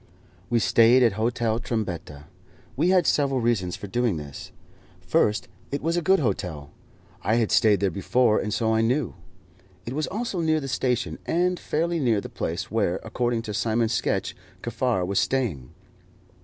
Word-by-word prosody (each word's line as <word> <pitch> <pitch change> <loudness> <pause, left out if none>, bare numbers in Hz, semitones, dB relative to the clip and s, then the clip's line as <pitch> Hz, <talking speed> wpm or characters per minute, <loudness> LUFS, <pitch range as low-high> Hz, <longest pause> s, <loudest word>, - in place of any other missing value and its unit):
We 120 - +2
stayed 115 +3 +5
at 115 - +5
Hotel 115 +1 0
Trombetta. 100 -11 -4 0.5
We 160 +7 +2
had 185 -1 +4
several 135 -3 +2
reasons 110 -7 0
for - - -8
doing 110 -2 0
this. 70 -3 -8 0.5
First, 105 0 +1 0.2
it 140 - -4
was 165 +2 +1
a 175 - +1
good 190 +3 +4
hotel. 90 - -3 0.5
I 110 - +1
had 115 -3 +1
stayed 105 -3 +4
there 100 -2 +2
before, 110 +5 +2
and 105 - -3
so 110 +2 +1
I 110 - +3
knew. 125 +3 0 0.7
It 120 - -5
was 155 +2 -1
also 210 -2 -3
near 160 -1 +2
the 135 - -5
station, 125 -2 -1
and 180 +1 +1
fairly 170 +2 -1
near 120 -7 +2
the - - -7
place 90 +5 -4
where, 100 -5 0
according 120 +1 -1
to 105 - -5
Simon's 110 +1 0
sketch, - - -1 0.3
Kaffar 120 -5 0
was 100 +2 +1
staying. 100 - -1
115 Hz, 170 wpm, -25 LUFS, 100-130 Hz, 0.7 s, stayed